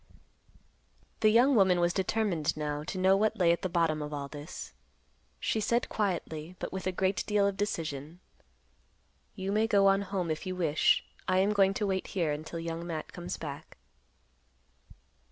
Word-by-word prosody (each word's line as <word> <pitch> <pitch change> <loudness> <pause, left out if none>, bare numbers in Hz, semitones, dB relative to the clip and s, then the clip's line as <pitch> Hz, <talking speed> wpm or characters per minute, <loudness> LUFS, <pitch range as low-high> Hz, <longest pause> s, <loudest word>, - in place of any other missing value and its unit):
The 215 - +5
young 245 +6 +5
woman 190 -6 +4
was 175 0 +2
determined 190 -6 0
now 150 -1 -2
to 185 - -5
know 190 +1 +4
what 215 +2 +1
lay 175 -4 +4
at 170 - 0
the 185 - -2
bottom 165 -3 +1
of 150 0 -5
all 140 -1 -4
this. 145 +3 -8 0.7
She 220 - 0
said 235 +3 0
quietly, 175 -5 -2
but - - -5
with 190 -1 -4
a - - +1
great 190 +1 0
deal 210 -1 +3
of 200 -1 0
decision, 165 -5 -3 1.2
"You 190 0 -3
may 215 +2 +2
go 200 -3 +4
on 195 0 +5
home 185 -4 -2
if 155 - -3
you 185 - -3
wish; 160 -4 +2 0.2
I 185 - +2
am 195 +3 +3
going 195 -1 +3
to 210 - 0
wait 190 -1 -1
here 170 -5 -1
until 155 +3 -5
Young 165 +1 -4
Matt 160 -2 -5
comes 175 +1 -5
back." 145 -3 -8
185 Hz, 175 wpm, -30 LUFS, 160-200 Hz, 1.2 s, The